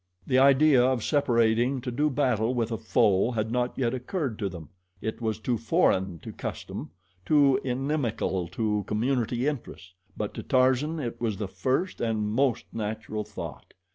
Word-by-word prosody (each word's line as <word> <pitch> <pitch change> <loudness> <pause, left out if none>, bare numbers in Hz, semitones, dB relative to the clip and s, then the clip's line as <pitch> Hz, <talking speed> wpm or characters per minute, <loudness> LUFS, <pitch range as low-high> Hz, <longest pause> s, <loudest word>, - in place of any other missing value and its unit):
The 130 -1 +3
idea 135 -1 +6
of 130 -3 +1
separating 120 -2 +2
to 125 0 -4
do 150 +5 +1
battle 125 -4 +1
with 115 -1 -1
a 115 - -1
foe 110 -3 +3
had 110 0 -1
not 125 0 -1
yet 120 -2 0
occurred 130 - -3
to 100 -3 -1
them 85 -5 -9 0.3
it 110 +4 -4
was 110 -2 -1
too 115 +2 -1
foreign 95 - +2
to - - -7
custom, - - -6 0.3
too 140 +1 +4
inimical 125 - -1
to 105 +3 -1
community 120 +2 0
interests; 120 -10 -4 0.2
but 105 - -3
to - - -5
Tarzan 130 +5 +2
it 120 -5 -5
was 110 -4 -1
the 105 -1 -3
first 130 - -1
and 110 -2 0
most 130 +2 +1
natural 110 0 -3
thought. - - -9
120 Hz, 165 wpm, -27 LUFS, 110-135 Hz, 0.3 s, idea